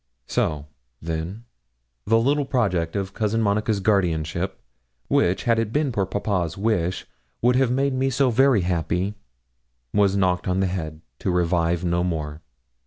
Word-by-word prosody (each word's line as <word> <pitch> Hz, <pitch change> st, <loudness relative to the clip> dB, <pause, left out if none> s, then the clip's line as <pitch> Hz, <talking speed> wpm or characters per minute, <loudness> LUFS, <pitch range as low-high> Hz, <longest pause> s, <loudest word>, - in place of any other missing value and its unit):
So, 75 Hz, +3 st, -1 dB, 0.3 s
then, 85 Hz, +7 st, -5 dB, 0.6 s
the 115 Hz, -, +5 dB
little 140 Hz, +5 st, +2 dB
project 95 Hz, -11 st, 0 dB
of 100 Hz, -1 st, -2 dB
Cousin 110 Hz, +2 st, 0 dB
Monica's 105 Hz, 0 st, +1 dB
guardianship, 90 Hz, -3 st, 0 dB, 0.5 s
which, 90 Hz, +2 st, +2 dB
had 115 Hz, -2 st, +2 dB
it 115 Hz, -2 st, -1 dB
been 145 Hz, +1 st, +1 dB
poor 100 Hz, -5 st, 0 dB
papa's 95 Hz, -4 st, -1 dB
wish, 95 Hz, -4 st, 0 dB, 0.4 s
would 125 Hz, +1 st, +4 dB
have 130 Hz, -1 st, +3 dB
made 135 Hz, +2 st, +1 dB
me 130 Hz, +1 st, +1 dB
so 130 Hz, 0 st, +2 dB
very 130 Hz, -2 st, +4 dB
happy, 90 Hz, +2 st, -1 dB, 0.8 s
was 100 Hz, -2 st, +3 dB
quite 100 Hz, -, 0 dB
knocked 90 Hz, -1 st, +1 dB
on 90 Hz, +1 st, +1 dB
the 95 Hz, -, +2 dB
head, 80 Hz, -4 st, -4 dB, 0.2 s
to -, -, -2 dB
revive 85 Hz, -1 st, +1 dB
no 85 Hz, 0 st, +1 dB
more. 80 Hz, -3 st, -3 dB
95 Hz, 155 wpm, -23 LUFS, 85-115 Hz, 0.8 s, the